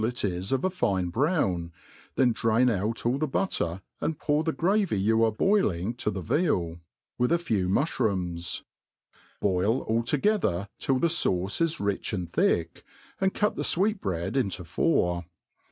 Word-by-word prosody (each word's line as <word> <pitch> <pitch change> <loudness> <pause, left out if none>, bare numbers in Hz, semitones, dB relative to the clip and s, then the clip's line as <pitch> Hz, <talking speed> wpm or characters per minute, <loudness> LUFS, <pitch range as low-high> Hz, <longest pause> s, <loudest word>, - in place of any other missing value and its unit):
ic 120 +2 -1
is 90 0 -3
of 135 0 +1
a - - +3
fine 95 - 0
brown, 95 - 0 0.4
then 130 -2 +4
drain 115 +2 +2
out 110 +3 -2
all 125 +3 +1
the 155 - 0
but* 190 +8 -1
ter, 85 +2 -2 0.2
and 160 -1 -2
pour 150 +1 +1
the 160 - 0
gravy 190 - +1
you 110 +3 +3
are 110 - +3
boiling 110 - +1
to^he 105 -6 -3
veal, 85 - 0 0.4
with 125 +4 +2
at 170 - +3
few 100 - 0
mufhrooms: 90 - -1 0.8
boil 100 +6 +1
all 115 +1 0
together 120 - +1
till 135 - +1
the 150 - +1
faUce 100 - 0
is 165 -1 +1
rich 100 0 -2
and 90 -4 -3
thick, 85 0 0 0.4
and 190 0 +1
cut 210 - +1
the - - -3
fweetbread 115 - 0
into 100 -8 -1
four. 90 - +1
110 Hz, 160 wpm, -27 LUFS, 90-155 Hz, 0.8 s, then